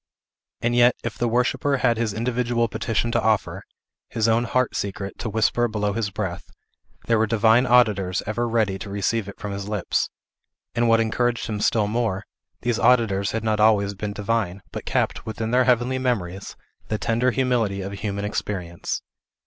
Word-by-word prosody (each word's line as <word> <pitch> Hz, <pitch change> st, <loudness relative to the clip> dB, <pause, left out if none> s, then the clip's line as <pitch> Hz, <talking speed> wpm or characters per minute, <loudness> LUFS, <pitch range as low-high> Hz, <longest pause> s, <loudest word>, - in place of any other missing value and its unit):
And 120 Hz, +1 st, +1 dB
yet, 120 Hz, 0 st, +5 dB
if 115 Hz, -, -3 dB
the 120 Hz, -, 0 dB
worshipper 125 Hz, +4 st, +1 dB
had 120 Hz, -3 st, +2 dB
his 115 Hz, -2 st, 0 dB
individual 120 Hz, +2 st, 0 dB
petition 115 Hz, +1 st, -1 dB
to 115 Hz, -, +1 dB
offer, 110 Hz, -2 st, 0 dB, 0.5 s
his 115 Hz, 0 st, 0 dB
own 115 Hz, +1 st, +3 dB
heart 130 Hz, +2 st, 0 dB
secret 100 Hz, 0 st, -4 dB
to 115 Hz, -, -3 dB
whisper 110 Hz, +3 st, +2 dB
below 105 Hz, -2 st, -1 dB
his 110 Hz, 0 st, -1 dB
breath, 95 Hz, -4 st, -5 dB, 0.6 s
there 115 Hz, -2 st, +2 dB
were 110 Hz, -, +2 dB
divine 115 Hz, +3 st, +4 dB
auditors 105 Hz, -7 st, +3 dB
ever 120 Hz, +3 st, -1 dB
ready 110 Hz, -4 st, +1 dB
to -, -, -7 dB
receive 100 Hz, +1 st, -1 dB
it 100 Hz, -, -10 dB
from 105 Hz, 0 st, -5 dB
his 100 Hz, +1 st, -5 dB
lips; 105 Hz, -3 st, 0 dB, 0.6 s
and 120 Hz, 0 st, +2 dB
what 115 Hz, 0 st, +5 dB
encouraged 120 Hz, +2 st, 0 dB
him 105 Hz, -2 st, -3 dB
still 110 Hz, -1 st, +2 dB
more, 105 Hz, -2 st, -1 dB, 0.4 s
these 120 Hz, -2 st, 0 dB
auditors 110 Hz, -5 st, +3 dB
had 110 Hz, -1 st, -2 dB
not 110 Hz, -1 st, 0 dB
always 105 Hz, -2 st, +4 dB
been 100 Hz, +1 st, -4 dB
divine, 100 Hz, -3 st, -2 dB
but -, -, -6 dB
kept, -, -, -1 dB
within 110 Hz, +1 st, -3 dB
their 125 Hz, +1 st, +4 dB
heavenly 125 Hz, +1 st, +2 dB
memories, 100 Hz, -8 st, -2 dB, 0.3 s
the 110 Hz, -, -1 dB
tender 115 Hz, +4 st, +1 dB
humility 120 Hz, -6 st, 0 dB
of 95 Hz, +1 st, -5 dB
a -, -, -6 dB
human 100 Hz, 0 st, -3 dB
experience. 90 Hz, -5 st, -3 dB
110 Hz, 180 wpm, -23 LUFS, 100-120 Hz, 0.6 s, yet